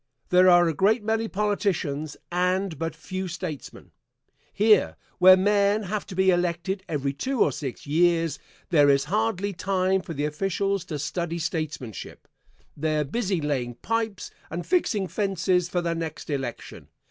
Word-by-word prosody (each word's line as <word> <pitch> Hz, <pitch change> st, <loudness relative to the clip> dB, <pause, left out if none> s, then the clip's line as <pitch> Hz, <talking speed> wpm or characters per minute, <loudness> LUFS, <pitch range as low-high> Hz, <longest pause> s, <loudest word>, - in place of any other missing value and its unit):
There 180 Hz, +1 st, +6 dB
are 175 Hz, -1 st, +6 dB
a 165 Hz, -, 0 dB
great 210 Hz, +7 st, +2 dB
many 225 Hz, +1 st, 0 dB
politicians 185 Hz, -8 st, -1 dB
and 180 Hz, -2 st, 0 dB
but 165 Hz, -1 st, -3 dB
few 185 Hz, +4 st, -5 dB
statesmen. 160 Hz, -6 st, -7 dB, 0.6 s
Here, 215 Hz, +1 st, +3 dB, 0.2 s
where 185 Hz, +1 st, +9 dB
men 205 Hz, +2 st, +2 dB
have 205 Hz, +2 st, -4 dB
to 190 Hz, -, -8 dB
be 190 Hz, 0 st, +4 dB
elected 175 Hz, +2 st, -1 dB
every 140 Hz, -3 st, -1 dB
two 255 Hz, -, -3 dB
or -, -, +4 dB
six 135 Hz, -6 st, -6 dB
years, 165 Hz, 0 st, +2 dB, 0.3 s
there 145 Hz, -4 st, +5 dB
is 140 Hz, -1 st, +4 dB
hardly 205 Hz, -1 st, -1 dB
time 190 Hz, +1 st, 0 dB
for 170 Hz, -3 st, -7 dB
the 145 Hz, +1 st, -1 dB
officials 195 Hz, +4 st, -1 dB
to 155 Hz, -4 st, -4 dB
study 170 Hz, +3 st, -3 dB
statesmanship 155 Hz, -, -5 dB, 0.5 s
they 155 Hz, +1 st, -1 dB
are 150 Hz, -, +2 dB
busy 190 Hz, -, -1 dB
laying 130 Hz, -5 st, -2 dB
pipes 225 Hz, -, -3 dB, 0.2 s
and 175 Hz, +2 st, -5 dB
fixing 250 Hz, -, +1 dB
fences 185 Hz, -3 st, 0 dB
for 175 Hz, -, 0 dB
the 170 Hz, -1 st, 0 dB
next 160 Hz, -2 st, -5 dB
election. 135 Hz, -4 st, -5 dB
180 Hz, 155 wpm, -25 LUFS, 155-200 Hz, 0.6 s, where